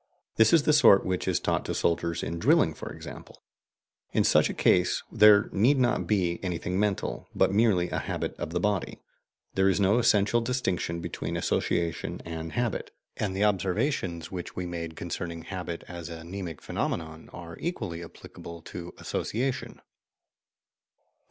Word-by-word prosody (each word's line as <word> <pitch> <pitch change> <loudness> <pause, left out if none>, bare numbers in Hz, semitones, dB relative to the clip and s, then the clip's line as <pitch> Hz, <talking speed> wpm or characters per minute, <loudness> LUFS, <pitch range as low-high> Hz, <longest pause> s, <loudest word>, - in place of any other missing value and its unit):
This 110 -1 +6
is 165 -3 +5
the 150 - +3
sort 100 -9 +6
which 90 -1 -1
is - - +2
taught - - 0
to - - -3
soldiers 85 0 0
in 85 - -3
drilling, - - +4
for - - -8
example. - - -11 0.7
In - - +3
such - - +4
a - - -3
case 90 0 +3
there 105 -2 +7
need 120 +9 +3
not 125 -2 +1
be 90 -5 +1
anything 90 0 -2
mental, 105 -2 -1
but - - +3
merely 100 -5 +3
a - - 0
habit - - -3
of - - -3
the 90 +2 -1
body. 100 0 -1 0.5
There 95 0 +3
is 95 - +1
no 100 +4 +4
essential 110 0 +3
distinction 95 -9 -1
between - - -4
association 85 -2 -1
and 80 -1 -6
habit, 120 0 -1 0.3
and 100 -3 -2
the 100 - +1
observations 95 - 0
which 90 -2 -6
we 90 - -3
made 85 -2 -5
concerning 85 0 -5
habit 90 -1 -5
as 85 -2 -7
a 80 -1 -8
mnemic 85 -3 -6
phenomenon 80 -1 -3
are 85 -1 -9
equally 105 - -4
applicable 85 0 -11
to 90 +1 -8
association. 125 +3 -3
90 Hz, 160 wpm, -28 LUFS, 85-105 Hz, 0.7 s, there